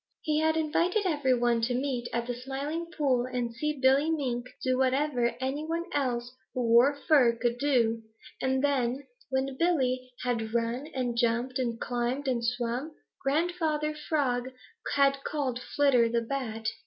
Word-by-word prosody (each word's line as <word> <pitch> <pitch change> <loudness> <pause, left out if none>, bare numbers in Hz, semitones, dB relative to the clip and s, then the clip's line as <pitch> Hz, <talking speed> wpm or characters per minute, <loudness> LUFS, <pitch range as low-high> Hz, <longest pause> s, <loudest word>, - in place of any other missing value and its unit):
He 305 -1 +1
had 315 0 +2
invited 340 +6 +1
every 290 -7 +2
one 240 -1 +2
to 245 +2 0
meet 250 -2 -2
at 235 0 -1
the 245 - -2
Smiling 275 +7 -4
Pool 265 -7 0
and 245 -2 -3
see 300 +4 -2
Billy 270 +4 +4
Mink 250 -6 -1 0.2
do 255 -1 +2
whatever 260 -1 +1
any 265 +3 -2
one 330 +2 -2
else 245 -3 -1 0.2
who 255 - 0
wore 245 +5 +6
fur 255 -7 +5
could 240 +1 0
do, 235 -6 +2 0.4
and 265 +1 +1
then, 270 -1 0 0.2
when 265 0 -1
Billy 255 -7 +1
had 230 -2 -2
run 235 +4 -1
and 245 -2 -1
jumped 240 +2 0
and 235 -3 -1
climbed 245 +3 -2
and 245 -3 0
swum, 245 +5 -2 0.3
Grandfather 305 +1 0
Frog 275 -5 -1 0.5
had 275 -1 +3
called 270 -5 -2
Flitter 255 -6 +3
the 235 0 +1
Bat. 230 -3 -4
260 Hz, 155 wpm, -29 LUFS, 240-290 Hz, 0.5 s, wore